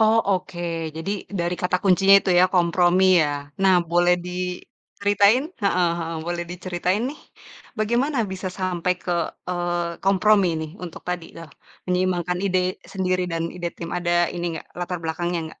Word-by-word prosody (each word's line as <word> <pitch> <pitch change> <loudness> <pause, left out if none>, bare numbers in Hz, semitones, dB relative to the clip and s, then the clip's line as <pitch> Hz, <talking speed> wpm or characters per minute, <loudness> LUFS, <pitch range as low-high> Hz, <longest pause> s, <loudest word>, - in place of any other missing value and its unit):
Oh 220 +1 +5 0.2
oke 175 -1 -10 0.4
jadi 165 +5 -4 0.3
dari 175 +1 0
kata 180 0 +2
kuncinya 195 +1 +5
itu 195 - -2
ya 180 - +7
kompromi 175 +1 +3 0.2
ya, 150 - 0 0.3
nah 190 -1 +5 0.2
boleh 175 +1 +4
diceritain? 200 +5 0 0.2
Heeh 180 -3 +3
heeh, 165 0 -4
boleh 175 0 -2
diceritain 180 +3 -1
nih 300 - -11 0.6
bagaimana 240 +6 +1
bisa 190 0 -5
sampai 180 -1 0
ke, 180 - -3 0.4
eee, 175 -1 -2
kompromi 200 0 +4
nih 155 -1 -5
untuk 170 - -9
tadi, 180 -2 -3
eee, 165 -3 -10 0.4
menyeimbangkan 180 -1 0
ide 185 -1 +2 0.3
sendiri 185 -1 0
dan 165 0 -1
ide 175 -1 -2
tim 170 0 -6
ada 175 -1 -2 0.2
ini 175 - -4
nggak - - -11
latar 180 0 -3
belakangnya 175 +2 -2
nggak? - - -17
180 Hz, 155 wpm, -23 LUFS, 175-190 Hz, 0.6 s, ya